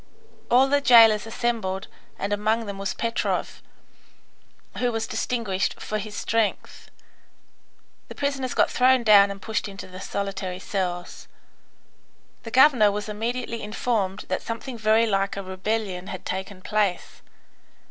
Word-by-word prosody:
All 255 +3 +5
the 285 +1 +2
jailers 225 -4 +6
assembled, 225 -5 -2 0.3
and 200 +1 -2
among 215 +2 0
them 200 -1 -6
was 195 0 -3
Petrov, 230 +1 -2 1.2
who 245 -1 +1
was 225 -1 -2
distinguished 210 -6 -2
for 215 - -3
his 210 0 -7
strength. 225 -2 -2 1.2
The - - -10
prisoners 275 -3 -2
got - - +3
thrown 255 0 +4
down 205 -3 +7
and 200 0 -6
pushed 220 +2 -3
into 195 -1 -9
the 185 0 -11
solitary 195 -2 -4
cells. 180 -2 -4 1.1
The 225 - -8
governor 250 -4 +5
was 210 +1 -4
immediately 230 +2 -3
informed 210 -2 -2
that 185 - -2
something 230 +3 -6
very 220 0 +3
like 195 -2 0
a 200 - -4
rebellion 190 0 -3
had 190 - -7
taken 190 0 -5
place. 205 -4 -1
215 Hz, 135 wpm, -24 LUFS, 195-230 Hz, 1.2 s, down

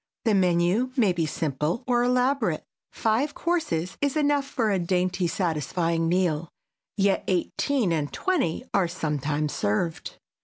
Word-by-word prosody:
The 225 - +3
menu 185 +6 +2
may 210 -7 +4
be 165 -2 -1
simple 150 - -2
or 245 -1 +2
elaborate. 250 - +1 0.3
Five 235 +7 0
courses 315 - -1
is 285 +1 +1
enough 290 -2 +2
for 225 -6 0
a 195 - +1
dainty 180 +1 0
satisfying 165 0 0
meal, 170 -3 +1 0.5
yet 195 -1 +2
eighteen 195 - 0
and 150 -3 -1
twenty 280 - -1
are 190 -3 +3
sometimes 150 -3 -2
served. 160 +11 -2
180 Hz, 130 wpm, -26 LUFS, 165-245 Hz, 0.5 s, may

